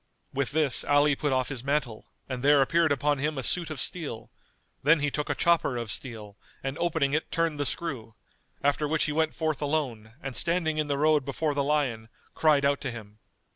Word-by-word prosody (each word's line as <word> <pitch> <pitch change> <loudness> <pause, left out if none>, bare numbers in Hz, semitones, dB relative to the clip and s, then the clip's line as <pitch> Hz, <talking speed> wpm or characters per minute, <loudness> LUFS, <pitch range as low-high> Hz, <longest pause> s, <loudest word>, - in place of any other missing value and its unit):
With 135 -1 -1
this 150 -4 +3
Ali 145 0 +3
put 145 0 -1
off 130 -1 0
his 130 -4 -4
mantle 135 -6 -2 0.2
and 130 -2 -4
there 140 0 +5
appeared 165 +3 +2
upon 145 +1 +1
him 150 +1 -1
a 135 - -3
suit 170 +6 +1
of 155 - -5
steel; 140 -11 -4 0.5
then 150 +4 +4
he 145 0 0
took 150 +1 -3
a - - 0
chopper 170 -7 +2
of 115 -2 -4
steel[FN#220] 110 -5 -4 0.3
and 135 +2 -3
opening 160 -5 +1
it 155 - -1
turned 165 -3 0
the 145 - 0
screw; 125 -10 -5 0.5
after 145 +1 +1
which 155 +1 +1
he 150 - -1
went 160 +1 0
forth 155 -3 -1
alone 130 -8 -2
and 135 -2 -6
standing 165 -2 +1
in 155 - 0
the 140 -1 -1
road 150 -1 +3
before 145 +3 -1
the 140 0 0
lion, 135 -7 -1 0.2
cried 150 -3 +3
out 140 0 +1
to 140 - -2
him. 110 -3 -10
145 Hz, 210 wpm, -27 LUFS, 130-155 Hz, 0.5 s, there